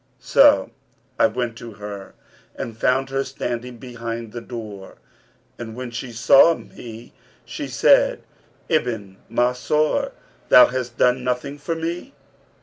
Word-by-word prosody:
So -, -, +4 dB, 0.5 s
I -, -, +6 dB
went 120 Hz, -2 st, -3 dB
to 115 Hz, -1 st, -9 dB
her 100 Hz, -1 st, -9 dB, 0.4 s
and 115 Hz, -, -6 dB
found 130 Hz, +3 st, +1 dB
her 135 Hz, 0 st, 0 dB
standing 125 Hz, -2 st, -5 dB
behind 115 Hz, -2 st, -6 dB
the 120 Hz, -, -6 dB
door; 110 Hz, -5 st, -9 dB, 0.6 s
and 110 Hz, -2 st, -7 dB
when 125 Hz, -1 st, -6 dB
she 120 Hz, +1 st, -6 dB
saw 125 Hz, +8 st, +6 dB
me 115 Hz, 0 st, -11 dB, 0.3 s
she -, -, -6 dB
said, -, -, +3 dB, 0.4 s
'O -, -, -4 dB
Ibn 105 Hz, -8 st, -5 dB
Mansur, 125 Hz, +6 st, +1 dB, 0.4 s
thou 125 Hz, -, +9 dB
hast 125 Hz, -1 st, -4 dB
done 125 Hz, 0 st, +3 dB
nothing 130 Hz, +3 st, -3 dB
for 165 Hz, +3 st, -3 dB
me?' 170 Hz, +11 st, -5 dB
125 Hz, 135 wpm, -22 LUFS, 115-135 Hz, 0.6 s, thou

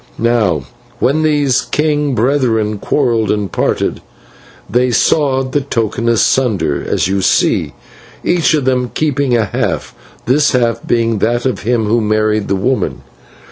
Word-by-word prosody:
"Now 110 Hz, -, +1 dB, 0.3 s
when 145 Hz, +5 st, +1 dB
these 145 Hz, -4 st, +2 dB
king 150 Hz, -2 st, 0 dB
brethren 115 Hz, -4 st, 0 dB
quarrelled 115 Hz, -6 st, 0 dB
and 105 Hz, -4 st, -1 dB
parted, -, -, -1 dB, 0.7 s
they 125 Hz, +3 st, +1 dB
sawed 135 Hz, +1 st, +1 dB
the 145 Hz, -, +1 dB
token 115 Hz, -3 st, -2 dB
asunder, 110 Hz, -, +1 dB
as -, -, 0 dB
you 95 Hz, 0 st, 0 dB
see, -, -, +1 dB, 0.5 s
each 170 Hz, -2 st, +2 dB
of 145 Hz, -4 st, -1 dB
them 125 Hz, -1 st, 0 dB
keeping 140 Hz, -5 st, +1 dB
a 110 Hz, -, +1 dB
half, -, -, -3 dB, 0.3 s
this 145 Hz, +5 st, +2 dB
half 115 Hz, -2 st, 0 dB
being 115 Hz, -2 st, +1 dB
that 120 Hz, +4 st, 0 dB
of 125 Hz, -7 st, -1 dB
him 115 Hz, 0 st, 0 dB
who 115 Hz, +3 st, +1 dB
married 110 Hz, 0 st, 0 dB
the 100 Hz, -, 0 dB
woman. 125 Hz, +7 st, -1 dB
120 Hz, 140 wpm, -15 LUFS, 110-135 Hz, 0.7 s, these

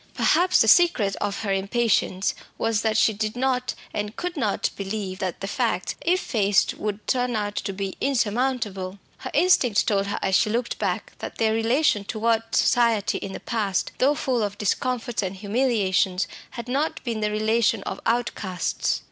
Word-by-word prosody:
Perhaps 365 Hz, +1 st, +4 dB
the 220 Hz, -, +4 dB
secret 220 Hz, -, +4 dB
of 205 Hz, 0 st, -2 dB
her 200 Hz, -3 st, -1 dB
impatience 195 Hz, -1 st, +1 dB, 0.2 s
was 225 Hz, -2 st, 0 dB
that 220 Hz, -1 st, +1 dB
she 220 Hz, -, +4 dB
did 215 Hz, +1 st, -3 dB
not, 255 Hz, 0 st, 0 dB, 0.2 s
and 210 Hz, +1 st, -3 dB
could 360 Hz, 0 st, -4 dB
not, 225 Hz, -9 st, 0 dB
believe 195 Hz, -1 st, -4 dB
that 185 Hz, -3 st, -3 dB
the 195 Hz, -, -3 dB
facts, 215 Hz, -5 st, -1 dB
if 360 Hz, +2 st, +2 dB
faced, 205 Hz, -, +2 dB
would 210 Hz, 0 st, -4 dB
turn 250 Hz, -2 st, 0 dB
out 205 Hz, -1 st, -2 dB
to -, -, -2 dB
be 195 Hz, 0 st, -4 dB
insurmountable. 225 Hz, -6 st, -1 dB, 0.2 s
Her -, -, -6 dB
instinct 250 Hz, -, +4 dB
told 200 Hz, -2 st, +1 dB
her 200 Hz, -, -2 dB
as 190 Hz, -, 0 dB
she 215 Hz, -, +4 dB
looked 235 Hz, +2 st, -2 dB
back -, -, -2 dB
that -, -, -7 dB
their 220 Hz, -1 st, +2 dB
relation 225 Hz, 0 st, +2 dB
toward 225 Hz, +2 st, +1 dB
society 230 Hz, -4 st, +2 dB
in 195 Hz, -, -6 dB
the -, -, -6 dB
past, 205 Hz, -5 st, -1 dB
though 280 Hz, +3 st, +4 dB
full 255 Hz, -4 st, 0 dB
of 205 Hz, -1 st, -2 dB
discomforts 240 Hz, +3 st, -1 dB
and 190 Hz, -1 st, -3 dB
humiliations, 200 Hz, -3 st, +1 dB, 0.3 s
had 235 Hz, 0 st, -6 dB
not 280 Hz, +5 st, -1 dB
been 230 Hz, -4 st, -2 dB
the 210 Hz, 0 st, 0 dB
relation 215 Hz, 0 st, +1 dB
of 195 Hz, -, -5 dB
outcasts. 225 Hz, -6 st, -1 dB
220 Hz, 175 wpm, -24 LUFS, 200-245 Hz, 0.3 s, Perhaps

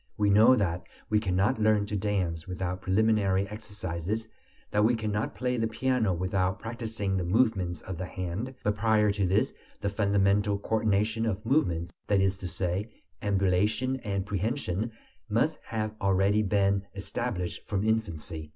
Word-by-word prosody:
We 105 Hz, -1 st, +3 dB
know 110 Hz, +5 st, +7 dB
that 90 Hz, -6 st, 0 dB, 0.3 s
we 105 Hz, -, +4 dB
cannot 100 Hz, +4 st, +1 dB
learn 105 Hz, -1 st, +3 dB
to 105 Hz, -, -4 dB
dance 95 Hz, -5 st, -1 dB
without 90 Hz, 0 st, -3 dB
preliminary 100 Hz, -1 st, +2 dB
exercises, 100 Hz, 0 st, -4 dB, 0.4 s
that 105 Hz, 0 st, +3 dB
we 120 Hz, +3 st, +4 dB
cannot 110 Hz, -1 st, -2 dB
play 125 Hz, +3 st, -1 dB
the 115 Hz, -1 st, +1 dB
piano 115 Hz, -2 st, +1 dB
without 95 Hz, +1 st, 0 dB
practising 110 Hz, -4 st, -3 dB
the 90 Hz, -, 0 dB
movements 95 Hz, -3 st, +1 dB
of 95 Hz, -3 st, -6 dB
the 95 Hz, -, -3 dB
hand; 95 Hz, +10 st, -4 dB
but 105 Hz, 0 st, +1 dB
prior 105 Hz, 0 st, +3 dB
to 100 Hz, -2 st, 0 dB
this, 95 Hz, +4 st, +2 dB, 0.3 s
the 100 Hz, -, -1 dB
fundamental 100 Hz, 0 st, +2 dB
coordination 110 Hz, +1 st, +1 dB
of 105 Hz, 0 st, -2 dB
movements, 90 Hz, -, +1 dB
that 100 Hz, -1 st, +3 dB
is 95 Hz, 0 st, +2 dB
to 95 Hz, -, -5 dB
say, 90 Hz, +4 st, -2 dB, 0.3 s
ambulation 105 Hz, +6 st, +1 dB
and 100 Hz, -6 st, -3 dB
prehension, 105 Hz, +1 st, -2 dB, 0.4 s
must 120 Hz, +9 st, +1 dB
have 110 Hz, -1 st, -2 dB
already 100 Hz, +2 st, +3 dB
been 100 Hz, -1 st, +2 dB
established 95 Hz, -2 st, -3 dB
from 100 Hz, -1 st, -1 dB
infancy. 85 Hz, -8 st, -2 dB
100 Hz, 150 wpm, -28 LUFS, 95-110 Hz, 0.4 s, know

